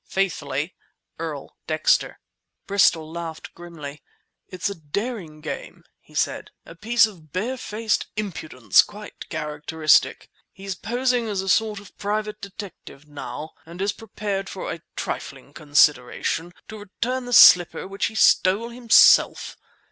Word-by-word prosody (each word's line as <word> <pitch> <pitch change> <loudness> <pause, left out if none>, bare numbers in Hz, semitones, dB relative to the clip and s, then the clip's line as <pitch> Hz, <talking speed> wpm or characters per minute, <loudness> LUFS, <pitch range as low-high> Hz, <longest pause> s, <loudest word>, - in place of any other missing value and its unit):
Faithfully, 155 -5 -2 0.5
EARL - - -6
DEXTER - - +1 0.5
Bristol 170 -6 +2
laughed 165 -1 -7
grimly. 155 -4 -10 0.5
"It's 185 +1 -3
a 200 - -3
daring 165 - -5
game," - - -7 0.2
he - - -21
said; - - -1 0.2
"a - - -11
piece 225 +6 +3
of 170 -9 -12
barefaced 225 - -2
impudence 155 - +2
quite 210 0 -11
characteristic. 150 +1 +1 0.2
"He's 195 0 -6
posing 245 +4 -1
as 200 -3 -2
a - - -7
sort 215 0 +2
of 200 -1 -16
private 210 +1 -3
detective 195 -7 -10
now, 150 +1 -7
and 170 +2 -12
is 200 +1 0
prepared 200 -2 -5
for - - -5
a - - -7
trifling - - -6
consideration 150 +2 +1 0.2
to 220 - -8
return 245 +6 -4
the 245 - -7
slipper 180 -4 +7
which 195 +1 -2
he 220 - -9
stole 215 +2 +3
himself! 240 -1 +5
195 Hz, 130 wpm, -23 LUFS, 160-215 Hz, 0.5 s, slipper